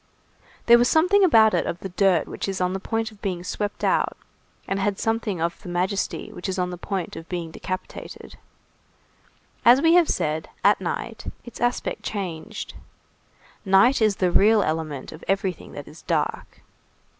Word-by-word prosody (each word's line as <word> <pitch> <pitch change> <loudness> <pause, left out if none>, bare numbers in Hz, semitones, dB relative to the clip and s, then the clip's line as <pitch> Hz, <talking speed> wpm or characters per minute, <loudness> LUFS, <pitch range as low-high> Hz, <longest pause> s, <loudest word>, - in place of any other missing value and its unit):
There 235 0 +7
was 245 - +3
something 365 +5 +4
about 225 - +6
it - - +1
of - - -2
the 190 - -7
dirt 185 -2 +2
which - - -5
is 195 - -3
on 180 0 0
the 190 - -2
point 225 +3 -2
of 210 - -19
being 180 -4 -3
swept 205 +2 -4
out, - - +1 0.5
and 195 0 0
something 225 -5 -1
of 170 +1 -2
the 185 - -9
majesty 185 +3 -2
which 185 - -5
is 190 - -2
on 180 -1 -1
the - - -4
point 185 -1 -4
of 165 - -9
being 170 -3 -4
decapitated. 185 +3 -7 1.3
As 240 +3 +7
we 325 +3 +4
have 350 -2 +5
said, 155 -2 -1
at - - +4
night, - - -4 0.2
its 240 - -10
aspect 240 0 -1
changed. 180 -6 -5 0.9
Night 200 +6 +4
is 215 -2 +3
the 180 -2 +1
real 210 +3 +5
element 155 -4 -3
of 155 - -11
everything 195 -2 -2
that 145 - -8
is 150 +1 -13
dark. - - -2
195 Hz, 170 wpm, -24 LUFS, 175-225 Hz, 1.3 s, There